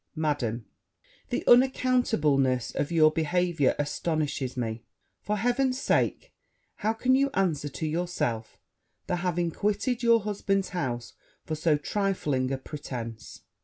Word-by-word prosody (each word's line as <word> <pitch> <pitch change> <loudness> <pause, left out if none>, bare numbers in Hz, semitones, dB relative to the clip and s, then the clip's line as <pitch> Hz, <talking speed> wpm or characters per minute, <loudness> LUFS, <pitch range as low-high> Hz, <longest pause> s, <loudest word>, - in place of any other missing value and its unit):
Madam, 135 -8 -1 0.6
The - - -1
unaccountableness 225 - +3
of 145 - -2
your 155 -2 +5
behaviour 165 -2 +1
astonishes 145 -3 -2
me! 115 -1 -3 0.4
For 210 0 -1
heaven's 255 +3 +1
sake, - - 0 0.4
how 220 +1 0
can 255 +3 +1
you 275 +1 +3
answer 160 -7 0
to 155 - -5
yourself 155 -9 -2 0.5
the 180 - -1
having 175 -1 -1
quitted 210 +7 -1
your 230 -1 +5
husband's 195 -2 -1
house 125 -9 -3 0.3
for 160 - -4
so 155 0 +2
trifling 150 -7 -1
a 135 - 0
pretence? 125 -5 -7
160 Hz, 125 wpm, -27 LUFS, 135-205 Hz, 0.6 s, your